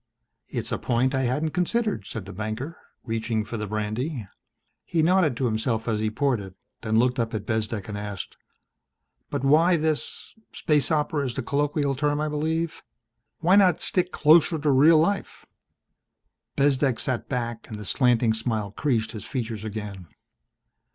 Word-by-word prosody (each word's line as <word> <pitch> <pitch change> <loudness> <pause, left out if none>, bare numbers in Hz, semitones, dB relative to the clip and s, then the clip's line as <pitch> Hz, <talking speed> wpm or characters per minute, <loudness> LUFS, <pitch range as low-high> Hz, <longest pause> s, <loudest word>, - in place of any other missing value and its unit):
"It's - - -4
a - - -1
point 125 +2 +1
I 130 -1 +1
hadn't 150 +6 0
considered," 210 +6 -1
said 110 -5 -6
the 100 - -9
banker, 110 - -4 0.3
reaching 115 -1 -1
for 115 +2 -6
the 105 -1 -4
brandy. 110 +4 -3 0.6
He 165 -2 0
nodded 170 -7 +3
to 130 - 0
himself 110 0 -1
as 110 -2 0
he 110 0 0
poured 130 +1 0
it, 95 -2 -10 0.3
then 110 -1 0
looked 125 +2 +2
up 115 -1 -1
at 105 -1 -4
Bezdek 110 -2 -2
and 105 - -5
asked, 105 -2 -6 0.9
"But - - -3
why 165 +5 +5
this 155 -1 -3 0.2
space 150 -5 +1
opera 150 -1 +1
is 120 - -5
the 135 - -3
colloquial 145 +1 0
term, 145 +2 0
I 155 0 -1
believe? 160 +2 -2 0.6
Why 175 +4 +5
not 190 -3 +5
stick 180 -1 0
closer 160 +2 +5
to 150 -1 +1
real 150 +5 +6
life?" 195 +6 0 1.1
Bezdek 135 -3 +2
sat 130 -2 -2
back 120 -3 -3
and 110 - -6
the 105 - -7
slanting 120 0 +3
smile 110 -3 -2
creased 110 -2 0
his 110 - -7
features 115 -5 -4
again. 105 -4 -6
125 Hz, 165 wpm, -25 LUFS, 110-150 Hz, 1.1 s, real